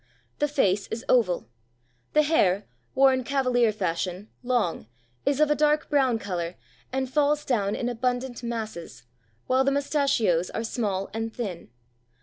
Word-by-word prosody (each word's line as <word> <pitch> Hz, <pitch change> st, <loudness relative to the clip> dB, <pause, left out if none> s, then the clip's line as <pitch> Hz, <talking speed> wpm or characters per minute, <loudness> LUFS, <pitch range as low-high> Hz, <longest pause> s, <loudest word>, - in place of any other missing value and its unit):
The 295 Hz, -, +2 dB
face 205 Hz, -9 st, +1 dB
is 225 Hz, +3 st, -5 dB
oval, 195 Hz, -, +2 dB, 0.7 s
the 305 Hz, -, +5 dB
hair, 205 Hz, -, +2 dB, 0.3 s
worn 265 Hz, -1 st, +4 dB
Cavalier 250 Hz, -3 st, +2 dB
fashion, 185 Hz, 0 st, -3 dB
long, 240 Hz, -, -1 dB, 0.4 s
is 280 Hz, 0 st, +2 dB
of 305 Hz, -1 st, +4 dB
a -, -, +4 dB
dark 300 Hz, +1 st, +2 dB
brown 265 Hz, -5 st, +3 dB
colour 180 Hz, -4 st, -4 dB, 0.4 s
and 265 Hz, 0 st, -1 dB
falls 295 Hz, +2 st, +1 dB
down 205 Hz, -6 st, 0 dB
in 240 Hz, -, -2 dB
abundant 245 Hz, +1 st, -2 dB
masses, 220 Hz, -, -5 dB, 0.4 s
while 260 Hz, +1 st, +3 dB
the 275 Hz, -, +3 dB
mustachios 275 Hz, -, +1 dB
are 225 Hz, -, -1 dB
small 205 Hz, -5 st, -2 dB
and 225 Hz, 0 st, -3 dB
thin. 195 Hz, -, -5 dB
240 Hz, 140 wpm, -26 LUFS, 200-270 Hz, 0.7 s, the